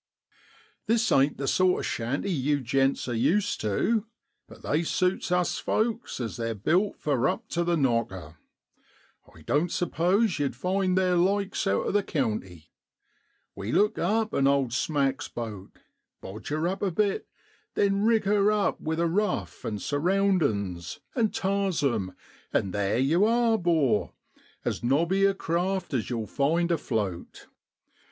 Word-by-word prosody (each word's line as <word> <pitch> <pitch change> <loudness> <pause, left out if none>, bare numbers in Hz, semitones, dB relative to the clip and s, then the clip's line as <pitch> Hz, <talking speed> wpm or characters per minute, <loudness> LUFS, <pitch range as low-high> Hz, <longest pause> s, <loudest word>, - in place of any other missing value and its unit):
This 225 0 +2
ain't 140 +2 +3
the 135 - -3
sort 185 +3 +3
of - - -4
shanty 130 +12 -2
yew 145 -2 +1
gents 135 +2 0
are 120 - -2
used 170 - +1
tu, 210 - 0 0.4
but - - -15
they 150 +3 +1
suits 180 +2 0
us 180 -1 +1
folks 230 - -1
as 115 -3 -4
they're 115 -1 -2
built 180 - +1
for 135 -3 +1
up 220 +8 -2
to 170 - 0
the 170 0 +1
knocker. 110 - -1 0.9
I 80 - -17
doan't 150 - 0
suppose 180 +3 +1
yow'd 140 -4 -1
find 185 +5 0
theer 185 -1 +2
likes 195 +2 +1
out 100 - +1
o' - - 0
the 205 - +2
county. 105 - -3 0.8
We 100 +3 -4
look 210 +2 +2
up 215 +4 0
an 135 - +3
owd 140 -4 +2
smack's 135 0 0
boat, 110 -5 -7 0.5
bodge 105 +3 -9
her 155 +3 -1
up 190 +2 -3
a 200 - +1
bit, 200 +3 0 0.5
then 200 0 +2
rig 225 -1 +3
her 205 +1 +3
up 210 -1 0
with 160 +1 -2
a 170 - +2
ruf, 185 +3 -1
an' 105 - -3
surroundin's, 145 - 0 0.2
an' 230 -4 +2
tars 195 -5 -1
'em 110 -9 -1 0.4
an' 95 - 0
theer 100 +2 0
yow 155 +10 +3
are, 230 0 +3
'bor 155 - +1 0.5
as - - -2
nobby 170 +10 +2
a 195 0 +2
craft 185 0 -2
as 125 -4 -1
yow'll 115 -3 -2
find 165 +8 0
afloat. 105 - -3
165 Hz, 155 wpm, -27 LUFS, 120-195 Hz, 0.9 s, ain't